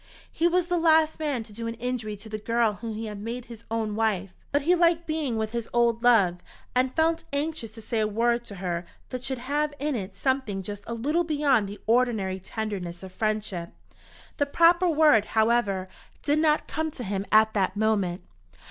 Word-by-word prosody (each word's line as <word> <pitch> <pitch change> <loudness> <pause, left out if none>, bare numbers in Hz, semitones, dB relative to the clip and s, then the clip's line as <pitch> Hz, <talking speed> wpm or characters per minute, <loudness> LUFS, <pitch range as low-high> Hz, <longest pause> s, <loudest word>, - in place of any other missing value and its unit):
He 335 - +2
was 355 0 +2
the 355 0 0
last 315 -1 +4
man 285 -7 -1
to 215 - -14
do 230 +2 -5
an 230 - -4
injury 235 -3 -3
to 205 +2 -11
the 215 0 -5
girl 230 0 +1
whom 225 +1 -6
he 225 +1 -4
had 210 -2 -6
made 235 +3 -5
his 230 -1 -12
own 220 -2 -1
wife! 205 -4 0 0.2
But 285 0 +1
he 345 +4 +4
liked 340 -1 +3
being 305 -7 -1
with 220 0 -2
his 235 -1 -4
old 235 -1 +2
love, 215 -8 +4 0.4
and 255 +1 +1
felt 325 +1 +2
anxious 285 -6 -3
to 225 - -9
say 225 +1 -1
a 215 - +2
word 235 +3 +1
to 200 - -8
her 175 -2 -3 0.2
that 255 -1 -5
should 265 0 -2
have 290 +4 -1
in 295 +1 -1
it 195 -3 -5
something 260 -8 -1
just 205 +1 -6
a 235 - -3
little 300 +9 +1
beyond 285 -10 +2
the 205 - -8
ordinary 220 -5 +1
tenderness 190 -3 -5
of 190 - -8
friendship. 210 -5 -2 0.6
The 285 - +1
proper 345 +4 +4
word, 300 -9 +5
however, 220 -4 +2 0.4
did 295 +1 +2
not 310 -1 +2
come 315 0 -2
to 270 -4 -7
him 195 -1 -3
at 220 0 +5
that 190 -2 0
moment. 205 -5 +1
230 Hz, 200 wpm, -26 LUFS, 210-290 Hz, 0.6 s, word